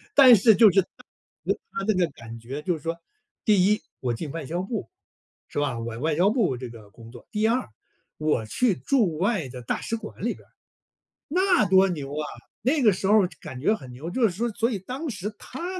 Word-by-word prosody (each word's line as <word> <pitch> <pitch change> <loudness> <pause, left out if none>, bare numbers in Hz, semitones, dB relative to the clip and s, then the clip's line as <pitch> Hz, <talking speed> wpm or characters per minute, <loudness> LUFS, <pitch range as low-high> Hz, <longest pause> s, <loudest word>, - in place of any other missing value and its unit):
但 260 -4 +9
是 220 +1 +5
就 220 -2 +7
是 195 - +5
他 185 - -11 0.8
他 195 - -4
那 215 - +4
个 180 -2 +2
感 115 -1 -10
觉 130 +6 -6
就 180 -2 0
是 155 - -10
说， 165 +2 -3 0.5
第 200 -4 +4
一 210 - +2 0.2
我 125 - -1
进 150 +4 -5
外 165 -1 -5
交 175 +6 -3
部， 210 +2 -4 0.6
是 - - -4
吧？ 135 -5 -1
我 115 0 -5
外 155 +3 0
交 185 +6 +3
部 210 - +1
这 125 0 -6
个 110 -3 -13
工 115 +2 -14
作。 120 - -14
第 215 +1 +1
二， 240 - 0 0.5
我 150 -7 0
去 205 - +1
驻 205 - +1
外 195 - 0
的 125 0 -9
大 120 - -2
使 230 - -3
馆 230 - -9
里 - - +1
边 - - -16
儿， - - -36 0.8
那 360 - +3
多 190 0 +6
牛 145 -6 -4
啊。 150 0 -2 0.4
那 285 +4 +2
个 220 -4 +6
时 190 +1 -3
候 210 0 +6
儿 - - +1
就 160 - -17
感 130 -1 -8
觉 210 - +3
很 130 -11 -11
牛， 145 +7 -7
就 255 - 0
是 220 - +4
说 230 +7 -2
所 230 +3 0
以 205 - -2
当 260 - -6
时 205 -3 -4
他 355 +7 -6
185 Hz, 245 characters per minute, -25 LUFS, 140-225 Hz, 0.8 s, 但